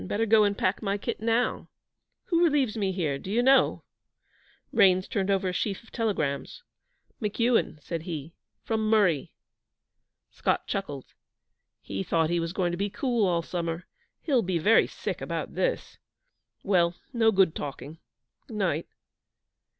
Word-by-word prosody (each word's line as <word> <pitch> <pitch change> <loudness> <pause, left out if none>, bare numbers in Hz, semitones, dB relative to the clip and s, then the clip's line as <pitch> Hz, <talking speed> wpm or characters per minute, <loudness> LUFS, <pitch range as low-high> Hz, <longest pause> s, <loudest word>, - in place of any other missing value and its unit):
Better 225 - 0
go 220 0 +5
and 200 -1 +1
pack 185 +2 0
my 200 -2 -1
kit - - -4
now. 230 +2 0 0.6
Who 340 -1 +3
relieves 285 -9 +2
me 200 -4 0
here 155 -7 -1
do 185 - -9
you 235 +3 +2
know?' 270 +2 +4 0.9
Raines 185 -4 +4
turned 200 -4 -1
over 195 -1 +1
a - - -3
sheaf 200 +3 -2
of 230 - -20
telegrams. 200 - -2 0.6
'McEuan,' 225 -5 +1
said 165 -2 -4
he, 160 -2 -6 0.3
'from 220 -1 -1
Murree.' 195 -10 +3 1.0
Scott - - -1
chuckled. 145 -9 -4 0.8
'He 95 -1 -4
thought 160 - +1
he 175 - +1
was 165 0 -2
going 180 -1 0
to 175 - -3
be 200 +1 0
cool 235 -2 0
all 170 -2 +1
summer. 170 0 -3 0.4
He'll 270 -6 +2
be 185 -4 -1
very 210 +8 +4
sick - - -5
about - - -4
this. - - -2 0.6
Well, 175 -3 +2 0.2
no 225 -2 +4
good 190 -5 +4
talking. 145 +2 -7 0.5
Night.' 190 -8 -1
195 Hz, 150 wpm, -27 LUFS, 170-225 Hz, 1.0 s, go